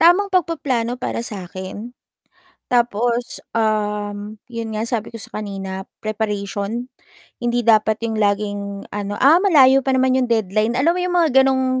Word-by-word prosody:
Tamang 375 +4 +5
pagpaplano 270 -9 0
para 250 - -3
sa 205 -5 -6
'kin 200 +5 -7 0.8
tapos, 240 0 +1 0.2
um, 210 -1 -1
'yon 230 -2 -5
nga 220 +2 -2
sabi 230 -2 -3
ko 230 - -8
sa - - -9
kanina, 195 -2 -5 0.2
preparation. 210 +2 -3 0.5
Hindi 240 0 0
dapat 220 -1 +4
'yong 220 -1 -1
laging, 200 -1 -1
ano, 205 0 -3
"Ah, 320 +6 +7
malayo 270 -9 +6
pa 265 0 0
naman 260 0 +3
yung 250 - 0
deadline." 220 +1 +1
Alam 305 +6 +3
mo 360 - -3
'yon 360 0 -1
mga 335 -3 +3
gano'ng 260 -1 +2
230 Hz, 155 wpm, -20 LUFS, 205-260 Hz, 0.8 s, Ah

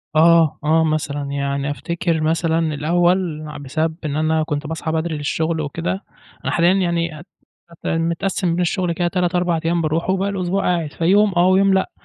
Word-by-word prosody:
آه، 165 -1 +5
آه 160 +2 +3
مثلًا، 155 -2 -1
يعني 140 0 -2
أفتكِر 165 +3 -2
مثلًا 160 0 +1
الأول 175 +1 +1
ع 150 - -8
بسبب 155 +3 -2
إن 145 -1 -2
أنا 155 0 +1
كنت 150 -1 -3
باصحى 160 0 -3
بدري 160 -1 -1
للشُّغل 160 +2 -1
وكده، 170 +6 -3 0.4
أنا - - 0
حاليًا 175 +2 +3
يعني 170 -4 -1
أت 170 - -14 0.4
أت 170 - -9
متقسِّم 170 +3 -1
بين 180 - 0
الشُّغل 175 0 0
كده 175 +1 0
3 180 0 0
4 175 -2 +1
أيام 170 0 +1
باروحُه 165 +4 0
وباقي 195 +1 0
الأسبوع 190 0 -1
قاعد، 170 -4 -1
فيوم 195 +4 +3
آه، 175 +1 +5
ويوم 195 +1 +4
لأ، 190 - +1
165 Hz, 180 wpm, -20 LUFS, 155-180 Hz, 0.4 s, آه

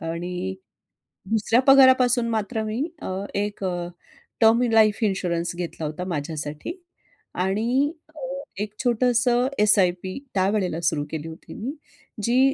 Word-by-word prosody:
आणि 175 +3 -4 0.8
दुसऱ्या 225 +2 +2
पगारापासून 260 -3 +6
मात्र 220 0 -1
मी 220 +6 -2 0.2
अ, - - -5 0.3
एक 205 0 -2
अ, 175 -2 -2 0.5
टर्म 225 +2 +6
इन 235 -2 0
लाईफ 215 -2 +5
इन्शुरन्स 175 -4 -1
घेतला 170 -2 -5
होता 155 +4 -4
माझ्यासाठी. 150 - -4 0.6
आणि 230 +10 +1 0.2
अ, - - -10 0.4
एक 210 0 -7
छोटंसं 245 +1 +2 0.2
एस-आय-पी 185 -3 +2 0.2
त्यावेळेला 190 -3 0
सुरु 150 -2 +1
केली 160 0 -4
होती 165 +1 -10
मी, 250 +6 -4 0.5
जी 240 +3 +3
205 Hz, 125 wpm, -24 LUFS, 175-235 Hz, 0.8 s, पगारापासून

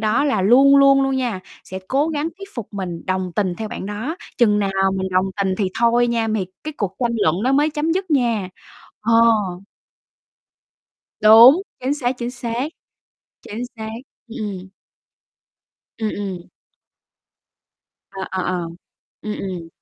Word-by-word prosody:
đó 220 +6 +1
là 275 -9 +1
luôn 270 +7 +6
luôn 275 0 +6
luôn 270 0 0
nha, 240 -7 -2 0.2
sẽ 190 - -7
cố 280 +4 +1
gắng 305 0 -2
thuyết 395 0 -9
phục 235 -5 -6
mình 180 -4 -5
đồng 185 -1 -2
tình 190 -4 0
theo 220 +2 -5
bạn 195 - -6
đó, 220 - -4 0.2
chừng 210 -4 +4
nào 200 -1 0 0.2
mình 190 0 -2
đồng 185 0 +2
tình 195 -2 0
thì 200 -3 +1
thôi 235 +1 +3
nha, 235 -1 0
m 215 - -1
thì 195 -4 -1 0.2
cái 310 - -4
cuộc 195 -3 -3
tranh 240 -2 +1
luận 170 +6 +1
đó 260 - +2
mới 295 +3 +3
chấm 305 +2 -1
dứt 375 -1 -2
nha. 235 -9 +1 0.5
Ờ. 230 - 0 2.1
Đúng, 230 - +8 0.2
chính 260 +3 0
xác, 255 -4 -1
chính 240 0 -3
xác. 240 +2 -3 0.7
Chính 220 +4 -6
xác, 220 -1 -6 0.4
ừm, 235 +3 -8
ừm. 185 0 -9 1.3
Ừm, 220 -1 -1
ừm. 190 -4 -6 1.6
Ờ, 195 -1 -7
ờ, 190 -1 -2
ờ. 180 -1 -2 0.5
Ừm, 215 - -4
ừm. 180 -4 -5
225 Hz, 160 wpm, -20 LUFS, 195-270 Hz, 2.1 s, Đúng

